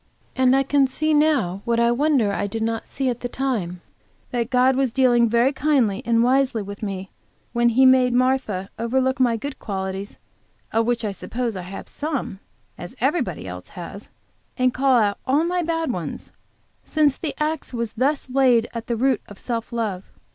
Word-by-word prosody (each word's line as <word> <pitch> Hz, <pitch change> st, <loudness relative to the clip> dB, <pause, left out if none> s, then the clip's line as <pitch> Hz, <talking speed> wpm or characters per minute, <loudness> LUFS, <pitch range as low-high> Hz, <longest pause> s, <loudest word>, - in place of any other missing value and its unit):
And 260 Hz, 0 st, +4 dB
I 270 Hz, -, +3 dB
can 275 Hz, 0 st, +3 dB
see 310 Hz, +4 st, 0 dB
now, 280 Hz, -, +2 dB
what 235 Hz, 0 st, +1 dB
I 235 Hz, 0 st, +4 dB
wonder 260 Hz, -4 st, +2 dB
I 205 Hz, -, -1 dB
did 220 Hz, +2 st, -3 dB
not 225 Hz, 0 st, -2 dB
see 270 Hz, -1 st, -3 dB
at 245 Hz, -2 st, -1 dB
the 245 Hz, -, -4 dB
time, 215 Hz, -11 st, -2 dB, 0.5 s
that 240 Hz, -2 st, -1 dB
God 255 Hz, +1 st, +3 dB
was 265 Hz, -2 st, +1 dB
dealing 240 Hz, -2 st, +4 dB
very 235 Hz, +4 st, +3 dB
kindly 260 Hz, -8 st, +1 dB
and 230 Hz, 0 st, +3 dB
wisely 255 Hz, -3 st, +2 dB
with 200 Hz, +1 st, -8 dB
me 195 Hz, -3 st, -5 dB, 0.4 s
when 240 Hz, 0 st, +3 dB
He 260 Hz, +3 st, +4 dB
made 255 Hz, -1 st, +5 dB
Martha 245 Hz, -6 st, 0 dB
overlook 260 Hz, +3 st, 0 dB
my 240 Hz, -3 st, +3 dB
good 280 Hz, +4 st, -6 dB
qualities, 195 Hz, -1 st, -5 dB, 0.6 s
of 225 Hz, +1 st, +2 dB
which 240 Hz, -2 st, 0 dB
I 205 Hz, -, -1 dB
suppose 230 Hz, +3 st, -4 dB
I 185 Hz, -, -4 dB
have 185 Hz, +2 st, -8 dB
some, 290 Hz, -10 st, -4 dB, 0.4 s
as 175 Hz, -, -8 dB
everybody 245 Hz, -, -1 dB
else 90 Hz, 0 st, -8 dB
has, 190 Hz, +4 st, -8 dB, 0.5 s
and 255 Hz, -1 st, +2 dB
call 265 Hz, -1 st, +3 dB
out 205 Hz, -3 st, +1 dB
all 285 Hz, +5 st, +3 dB
my 355 Hz, +1 st, 0 dB
bad 325 Hz, -3 st, -1 dB
ones, 170 Hz, -8 st, -6 dB, 0.5 s
since 300 Hz, -3 st, +2 dB
the 315 Hz, -, -5 dB
axe 305 Hz, 0 st, -2 dB
was 235 Hz, -3 st, -3 dB
thus 275 Hz, +5 st, 0 dB
laid 250 Hz, -3 st, +3 dB
at 230 Hz, -1 st, -6 dB
the 235 Hz, -, 0 dB
root 255 Hz, 0 st, +1 dB
of 205 Hz, -, -12 dB
self 230 Hz, +1 st, -4 dB
love. 215 Hz, -5 st, -3 dB
245 Hz, 185 wpm, -22 LUFS, 215-270 Hz, 0.6 s, made